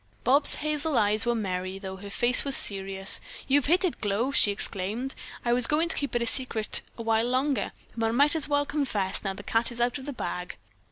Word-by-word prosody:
Bobs' 280 +3 +3
hazel 305 -1 -1
eyes 210 +2 +2
were 240 - +2
merry, 185 -3 -3
though 190 -1 -7
her 200 +1 -9
face 240 +5 +4
was 275 -1 +1
serious. 195 -1 0 0.3
"You've 280 0 +2
hit 355 +5 +3
it, 350 - -3
Glow!" 215 +6 0
she 245 - +3
exclaimed. 205 +6 -2 0.3
"I 240 - +2
was 245 -1 +3
going 320 +3 +1
to - - -1
keep 280 -3 -3
it 240 - +1
a - - -1
secret 230 -3 +2 0.2
a 230 - -5
while 225 +1 +1
longer, 255 -2 0 0.2
but 225 -1 0
I - - 0
might 285 +6 +3
as 310 -2 0
well 290 0 +2
confess, 250 -11 -2
now 195 -2 -2
that - - -14
the 205 - -9
cat 225 +3 +1
is 240 - -8
out 240 +4 0
of 265 - -10
the 285 - -4
bag." 180 -5 -5
240 Hz, 230 wpm, -27 LUFS, 205-280 Hz, 0.3 s, face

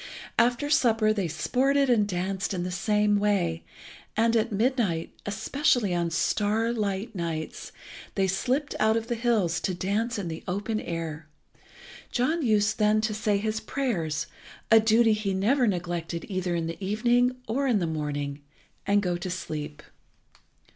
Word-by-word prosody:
After 245 +4 +2
supper 225 -6 +3
they 200 -4 -1
sported 265 - +1
and 225 -5 +3
danced 190 +1 -2
in 175 - -2
the 180 - -3
same 205 +2 +2
way, 180 -5 0 0.5
and 230 +1 +3
at 225 +1 +1
midnight, 210 -6 0
especially 220 0 +1
on 170 -1 0
star 215 +7 +1
light 205 -1 -2
nights, 165 -4 -4 0.4
they 195 - +2
slipped 255 +9 0
out 220 +1 +3
of 225 - -2
their 240 - -1
hills 215 -8 +1
to 185 - -2
dance 210 +6 -1
in 195 -4 -3
the 160 -1 -6
open 205 +4 -2
air. 165 -4 -5 0.8
John 310 +7 +1
used 215 -3 +2
then 215 0 +4
to 215 0 -1
say 210 -1 +1
his 215 +2 -1
prayers, 175 - -2 0.5
a 225 - +9
duty 225 +1 +4
he 205 -2 -1
never 240 +7 +2
neglected 175 -3 -2
either 185 -3 -2
in 165 -1 -1
the 165 +4 -6
evening 240 +5 +2
or 270 +5 0
in 240 -5 +3
the 180 - 0
morning, 145 -2 -3 0.5
and 205 0 +3
go 175 -2 0
to 185 +1 -5
sleep. 150 -4 -5
205 Hz, 155 wpm, -27 LUFS, 175-230 Hz, 0.8 s, a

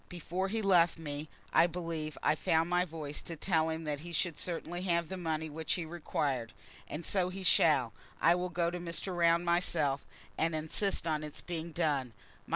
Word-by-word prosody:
Before 180 +2 -2
he 220 +2 -2
left 175 -4 +5
me, 150 -1 -5 0.2
I 170 - +6
believe 165 -3 -4
I - - +4
found 160 +2 +1
my 180 0 +3
voice 155 -3 -6
to 165 - -6
tell 160 -1 +1
him 160 0 -3
that 150 -2 -2
he 170 +3 -8
should 170 -1 -1
certainly 175 0 -3
have 170 -3 +1
the 190 - -3
money 160 -3 -2
which 155 0 -2
he 175 - -2
required. 140 -7 -2 0.3
And 155 +3 -5
so 185 -2 +1
he 190 +1 -6
shall. 140 - +4 0.3
I 170 - +6
will 180 +1 -1
go 170 -1 0
to 180 - -4
Mr. 175 +2 -2
Round 170 0 +4
myself, 160 -5 +1 0.3
and 165 0 +2
insist 160 +3 0
on 155 -2 0
its 150 -1 -7
being 170 -1 -4
done. 145 -7 0
165 Hz, 190 wpm, -32 LUFS, 155-175 Hz, 0.3 s, I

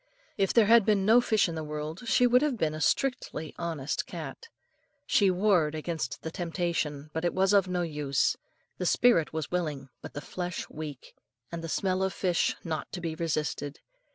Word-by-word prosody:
If 195 -1 +1
there 230 -3 +5
had 230 +1 +6
been 200 -2 +2
no 230 +4 +6
fish 220 -4 +2
in 170 - -4
the 160 -1 -4
world, 150 +7 -5
she 250 - +4
would 245 +1 +5
have 295 -5 0
been 155 -6 0
a 155 - -5
strictly 245 - 0
honest 160 -5 -2
cat. 460 - -7 0.6
She 200 -2 +4
warred 180 -5 +2
against 155 -4 -4
the 160 - -4
temptation, 165 -4 -2
but 160 - -2
it 175 - 0
was 190 +2 +3
of 195 -2 +5
no 180 -1 -1
use; 150 -4 0 0.4
the 180 - 0
spirit 205 -9 +4
was 160 -1 -4
willing 150 -7 -2
but - - -9
the - - -2
flesh 180 +1 -5
weak, 150 -4 -8 0.4
and 170 -1 -5
the 165 - -5
smell 185 +2 0
of 190 0 0
fish 180 -3 +1
not 160 -3 -4
to 180 - -3
be 165 -2 -3
resisted. 150 -3 -2
170 Hz, 190 wpm, -29 LUFS, 155-195 Hz, 0.6 s, had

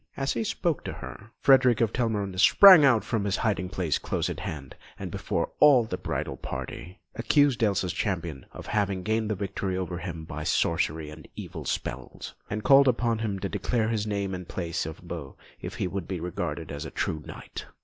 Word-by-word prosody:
As 135 0 0
he - - -1
spoke 175 - -1
to - - -4
her, 110 - -10
Frederick 130 -4 +5
of 115 -2 +1
Telramund 105 -6 -1
sprang 185 - +9
out 125 -6 +5
from 105 -3 -1
a - - -1
hiding 100 -4 0
place 90 -5 -1
close - - -2
at - - -6
hand, 70 -4 -6 0.2
and, - - -6
before - - -2
all 140 -5 +7
the 110 - -4
bridal - - -4
party, 90 +5 -7
accused 145 -5 +2
Elsa's 95 -4 +1
Champion 85 -8 -3
of - - -10
having 100 -3 -1
gained 110 +1 0
the 105 - 0
victory 95 -1 -3
over 90 -2 -3
him 85 -2 -6
by 75 0 -6
sorcery 80 -1 0
and 75 0 -12
evil - - -7
spells, - - -5 0.2
and 105 +1 -3
called 140 0 +7
upon 115 -2 +1
him 105 -3 -2
to 100 - -3
declare 110 +3 -1
his 110 -2 -1
name 100 -2 -2
and 90 -1 -6
place 85 -3 -3
of 80 - -7
abode 85 -5 -8 0.3
if - - -6
he - - -2
would 95 -2 -4
be 95 -2 -3
regarded 85 +1 -4
as 70 +1 -5
a 80 - -6
true 80 - -2
knight. - - -8
100 Hz, 200 wpm, -27 LUFS, 85-115 Hz, 0.3 s, sprang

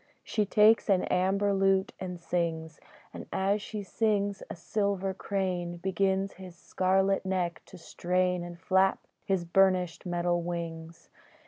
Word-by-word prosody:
She 210 -2 -1
takes 215 +2 +4
an 190 -2 +3
amber 195 +2 +1
lute 195 0 +2
and 180 -2 -5
sings, 165 -2 -3 0.3
And - - -8
as 200 +2 0
she 210 0 -6
sings 205 -1 0
a - - -5
silver 195 +2 -1
crane 185 -3 -3
Begins 190 +1 0
his 180 -2 -10
scarlet 190 +2 +1
neck 180 -3 -2
to 185 - -12
strain, 180 +1 -1
And 175 0 -9
flap 190 +2 +2 0.2
his 190 -4 0
burnished 185 0 +2
metal 175 0 0
wings. 165 -1 -6
185 Hz, 135 wpm, -29 LUFS, 175-195 Hz, 0.3 s, takes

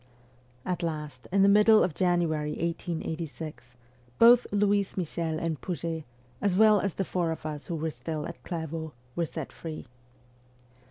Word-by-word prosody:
At 180 0 -2
last, 150 -6 -4
in 195 +1 +4
the - - +6
middle 210 +2 +6
of 180 - 0
January 165 -4 +1
1886, 160 -5 -4 0.4
both 240 +1 +7
Louise 205 -1 +1
Michel 165 -2 -2
and 160 -2 -2
Pouget, 165 -3 -3 0.4
as 200 -3 +2
well 215 -1 +6
as 195 -2 -2
the 195 - -1
four 175 -2 -1
of 160 - -6
us 150 -2 -5
who 170 - -2
were 160 0 -2
still 155 0 -4
at 170 - -9
Clairvaux, 160 -2 -5 0.2
were 170 -1 0
set - - -6
free. 160 -3 -7
170 Hz, 155 wpm, -28 LUFS, 155-190 Hz, 0.4 s, both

